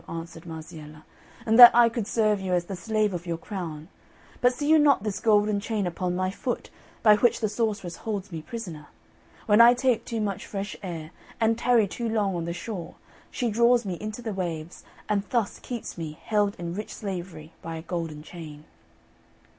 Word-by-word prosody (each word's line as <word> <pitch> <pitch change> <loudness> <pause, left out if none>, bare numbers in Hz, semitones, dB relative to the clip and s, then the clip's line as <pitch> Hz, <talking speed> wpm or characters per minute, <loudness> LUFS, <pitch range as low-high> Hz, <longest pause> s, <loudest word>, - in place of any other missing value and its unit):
answered 165 0 -7
Marziella, 155 -2 -9 0.4
"and 225 +1 +3
that 240 -1 +14
I 240 0 +7
could 230 -2 -3
serve 215 -3 +1
you 185 -1 -2
as 175 -1 +1
the 195 - -5
slave 215 +2 0
of 175 0 -5
your 170 -1 -2
crown! 165 -5 -6 0.5
But 245 - +5
see 290 +4 -4
you 315 0 +6
not 280 -8 +4
this 205 -3 -2
golden 210 -1 +3
chain 210 -1 -2
upon 180 +1 -2
my 185 +1 0
foot, 245 +5 -4 0.3
by 210 -2 +7
which 240 +2 +3
the 220 - 0
sorceress 205 -5 -2
holds 205 -3 -4
me 160 -2 -5
prisoner? 165 -5 -7 0.6
When 210 +1 +6
I 240 +1 +8
take 250 -2 +1
too 230 - -4
much 205 -3 -3
fresh 200 0 -5
air, 165 -4 -6 0.3
and 225 0 +3
tarry 235 -2 +3
too 230 +4 -4
long 205 -4 0
on 170 -1 -3
the 170 - -3
shore, 175 -1 -6 0.3
she 240 -3 -2
draws 235 +1 +4
me 185 -2 -3
into 215 +3 -6
the 220 -2 -3
waves, 170 -3 -5 0.2
and 210 -1 +1
thus 235 -5 -1
keeps 235 -7 -6
me 155 -2 -6
held 205 -2 +1
in 170 -1 -5
rich 210 +3 -6
slavery 175 -6 -6
by 165 0 -6
a 160 - -7
golden 165 -4 -4
chain." 155 -3 -10
200 Hz, 195 wpm, -26 LUFS, 170-225 Hz, 0.6 s, that